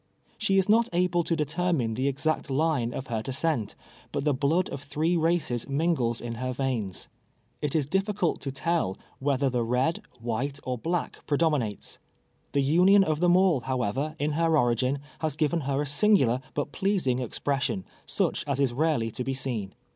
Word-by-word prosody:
She 195 -3 +2
is 190 - +3
not 230 +2 +4
able 175 0 +2
to 165 - 0
determine 150 -5 0
the 130 +5 0
exact 145 +3 -1
line 135 -4 +1
of 130 - -5
her 115 -4 -2
de 135 - -5
scent, 130 -6 -1 0.4
but 140 - -2
the 150 -1 +2
blood 150 +7 +1
of 135 - -5
three 155 +4 0
races 160 -7 0
mingles 140 -6 +1
in 120 -1 -4
her 130 0 -1
veins. 120 -8 -2 0.5
It 150 -1 -2
is 150 -3 +2
difficult 195 +2 0
to 135 - -3
tell 145 - -1 0.2
whether 140 0 +1
the 125 -2 0
red, 125 +8 0 0.2
white, 125 +5 -2
or 130 - -2
black 170 +5 -2
predominates. 145 -9 0 0.5
The 140 - +3
union 180 +8 +5
of 155 -4 0
them 175 +1 +5
all, 185 -6 +4
however, 130 +4 -2
in 150 +1 0
her 165 +1 +2
origin, 125 +1 +2 0.2
has 155 -3 -1
given 155 +2 +1
her 140 +1 +1
a - - -4
singular 145 - +3
but 145 0 -2
pleasing 185 -11 0
expression, 130 -4 -2 0.2
such - - 0
as 140 -1 -1
is 135 -4 +2
rarely 135 -5 +1
to 125 - -4
be 135 +1 -2
seen. 115 -7 -3
140 Hz, 175 wpm, -27 LUFS, 125-165 Hz, 0.5 s, union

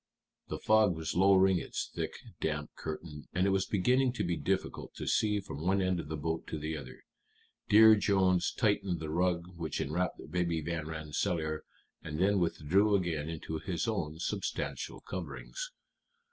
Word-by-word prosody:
The - - -3
fog 110 -4 +4
was 80 -1 -3
lowering 95 0 +5
its - - -4
thick, - - -3 0.2
damp 75 -1 -2
curtain, 75 -1 -6
and 90 +1 +2
it 100 - +3
was 95 0 +1
beginning 125 +6 +2
to - - -2
be 85 -1 0
difficult - - -2
to - - -5
see 105 -1 +2
from 75 -7 -7
one 95 +4 +2
end 95 -2 +1
of 80 - -5
the 80 +1 -3
boat 80 +2 -3
to - - -4
the 80 +1 -3
other. 75 - -9 0.7
Dear 110 +1 +9
Jones 95 -3 +2
tightened 100 -5 +1
the 80 -1 -4
rug 85 0 +1
which 80 -2 -3
enwrapped 85 +6 -2
Baby 85 -2 0
Van 80 0 -3
Rensselaer, 80 0 -2 0.4
and 75 -1 -5
then 100 +2 +3
withdrew 90 +5 +2
again 80 -5 -1
into 80 -1 -4
his 85 +1 -2
own 80 -9 -2
substantial 80 - -3
coverings. - - -6
90 Hz, 165 wpm, -32 LUFS, 80-100 Hz, 0.7 s, Dear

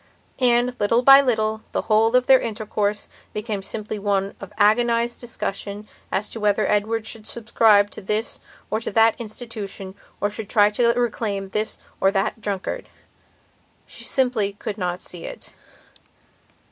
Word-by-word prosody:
And, 245 0 +3
little 230 +4 +2
by 275 +1 +9
little, 220 -4 0
the - - -1
whole 225 +2 +3
of 250 0 +4
their 265 0 +7
intercourse 210 -2 -2 0.3
became 210 -1 -3
simply 210 +2 -5
one 200 -1 0
of 195 - -9
agonized 235 +3 +2
discussion 205 -3 -5 0.2
as 205 - 0
to 225 - -6
whether 210 -1 +2
Edward 215 +2 0
should 220 -1 -5
subscribe 215 -3 +3
to - - -8
this 210 +3 -1 0.3
or 220 - +1
that 225 0 +3
institution 215 -4 -6 0.3
or 205 - 0
should 210 -1 -6
try 205 -1 +4
to 235 +2 +2
reclaim 215 -5 -2
this 215 +2 -1 0.2
or 195 - +4
that 200 +3 -1
drunkard. 200 -2 -4 1.0
She - - -7
simply 245 -7 +1
could 205 +1 -6
not 180 -1 -2
see 175 -2 -7
it. - - -8
215 Hz, 145 wpm, -23 LUFS, 205-230 Hz, 1.0 s, by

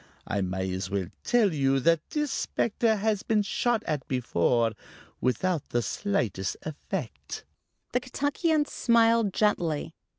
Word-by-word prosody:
I 100 - -1
may 95 0 -2
as 95 0 -3
well 95 -3 -2
tell 220 -7 +3
you 135 -2 +2
that 165 +3 +4
this 295 -2 -1
specter 225 0 +1
has 210 -1 0
been 215 -2 +2
shot 225 +3 0
at 150 -5 -2
before 120 -2 +1 0.5
without 165 +5 0
the 120 0 0
slightest 110 - -1
effect." 155 - -5 0.5
The 250 - +2
Kentuckian 290 +4 0
smiled 230 -5 +3
gently. 175 -8 0
180 Hz, 130 wpm, -28 LUFS, -, 0.5 s, that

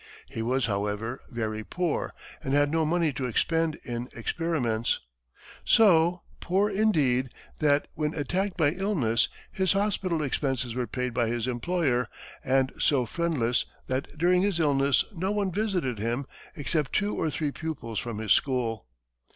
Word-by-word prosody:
He 115 - -5
was, 125 +3 +1
however, 105 +4 -2
very 110 -3 -3
poor 175 +6 -2 0.3
and 135 +1 0
had 145 0 +3
no 160 -1 +2
money 165 -2 +2
to 130 -1 -2
expend 165 +6 +1
in 120 +1 -4
experiments 120 -4 0 0.6
so 175 -4 +5 0.2
poor, 195 +4 +1
indeed, 150 -12 +2 0.3
that 145 -1 +3
when 150 0 -2
attacked 185 +6 -1
by 150 -4 +3
illness, 155 - +1 0.2
his 190 0 +1
hospital 195 -5 0
expenses 130 -3 -1
were 125 0 -2
paid 125 +2 -3
by 120 -1 +1
his 120 0 -1
employer, 130 0 0 0.4
and 130 0 +2
so 135 -4 +3
friendless 130 -4 0 0.2
that 130 +1 -2
during 180 +3 +4
his 195 -3 +1
illness 140 -3 +3
no 185 +1 -2
one 205 -2 0
visited 180 - -1
him 120 +5 -1 0.3
except 150 -2 -1
two 205 0 +1
or 160 - 0
three 150 0 -2
pupils 135 -9 -4
from 115 -3 -4
his 110 -1 +3
school. 120 - 0
145 Hz, 150 wpm, -27 LUFS, 120-170 Hz, 0.6 s, so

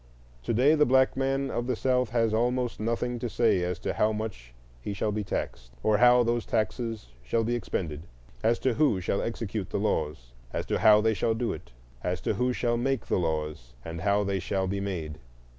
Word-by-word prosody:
To - - 0
day 135 +6 +5
the 150 -1 +4
black 130 +1 +4
man 135 0 0
of 120 0 -2
the 125 - 0
South 125 -1 +1
has 115 -1 +1
almost 120 +2 0
nothing 115 +2 -1
to 120 - -3
say 115 -5 +2
as 90 0 -1
to - - -2
how 110 - +2
much 105 - -5 0.3
he 100 - -4
shall 105 - -1
be 105 0 -2
taxed, 60 -9 -4
or 105 -1 +3
how 125 0 +6
those 120 0 0
taxes 110 - -2
shall 115 - 0
be 120 +2 0
expended; 85 -8 -3 0.3
as 115 +2 +2
to 130 - +3
who 140 -8 +2
shall 95 +2 -1
execute 110 -3 -3
the - - -2
laws, 75 - -2 0.2
and - - -3
how 105 0 +5
they 110 +1 +2
shall 110 +3 0
do 120 +1 -1
it; - - -10 0.3
as 90 -1 -1
to - - 0
who 125 +1 +1
shall 120 -1 0
make 135 0 -1
the - - 0
laws, 75 -7 -3
and 80 0 -5
how 100 +2 +2
they 100 -1 -1
shall 95 +1 -1
be 100 +1 -2
made. 85 -6 -4
110 Hz, 210 wpm, -28 LUFS, 95-120 Hz, 0.3 s, how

